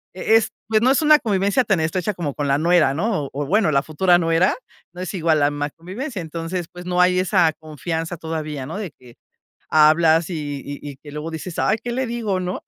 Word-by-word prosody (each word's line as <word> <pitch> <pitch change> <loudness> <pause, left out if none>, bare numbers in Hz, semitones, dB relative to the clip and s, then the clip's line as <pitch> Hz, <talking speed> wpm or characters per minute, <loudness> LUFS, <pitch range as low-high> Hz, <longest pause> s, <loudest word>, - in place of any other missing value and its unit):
e 220 +4 +2
es, 225 - 0 0.2
pues, 220 0 +2
no 255 - +4
es 275 +3 +3
una 305 0 +6
convivencia 200 +2 +1
tan 195 -7 +1
estrecha 185 +5 -1
como 150 -6 -3
con 145 -1 -3
la 140 0 +2
nuera, 165 -4 +3
¿no? 190 -4 -1
o - - -8
o 145 +1 -3
bueno, 200 +2 +2
la 140 0 +2
futura 175 +3 +3
nuera 165 +2 +2 0.4
no 180 +1 -9
es 185 - -5
igual 165 -4 +2
la 145 0 +3
más 145 0 -3
convivencia. 205 - -6
Entonces, 165 +2 -4
pues, 180 0 -10
no 180 0 0
hay 180 0 +4
esa 180 -3 +3
confianza 160 +2 -4
todavía, 155 -4 -5
¿no? 165 +8 -6
De 195 -7 -5
que 125 -2 -17 0.6
hablas, 160 +2 +4
y 145 -4 -4
y 145 0 -6
y 145 -2 -8
que 150 - -10
luego 150 +2 -5
dices, 160 +2 -7
"Ay, 220 - +2
¿qué 240 - -4
le 260 +1 -1
digo?", 230 -5 -2
¿no? 180 0 -4
170 Hz, 225 wpm, -21 LUFS, 155-190 Hz, 0.6 s, una